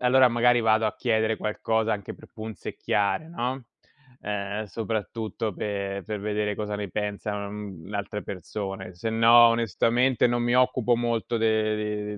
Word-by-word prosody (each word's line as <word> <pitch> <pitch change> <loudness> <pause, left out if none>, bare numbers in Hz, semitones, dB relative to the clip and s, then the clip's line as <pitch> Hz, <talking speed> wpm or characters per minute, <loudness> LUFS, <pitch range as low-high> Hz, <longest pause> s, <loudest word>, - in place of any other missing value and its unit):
allora 125 +1 +5
magari 120 0 +3
vado 110 0 +3
a 110 - 0
chiedere 110 -2 +1
qualcosa 110 +1 0
anche 100 -2 -7
per - - -16
punzecchiare, 110 - -2
no, 130 -4 -3 0.6
ehm, 105 +1 -3
soprattutto 110 0 -3
per 100 -1 -3
per 105 -1 -4
vedere 105 0 -1
cosa 105 0 -3
ne 100 -3 -5
pensano, 105 0 -3
uhm, 100 -5 -8
l'altre 100 0 -4
persone. 95 0 -6
Sennò 115 +4 +6
onestamente 115 +2 +2
non 120 0 0
mi 120 +1 +1
occupo 125 -1 +3
molto 120 0 -1
de 105 -1 0
110 Hz, 140 wpm, -26 LUFS, 105-115 Hz, 0.6 s, Sennò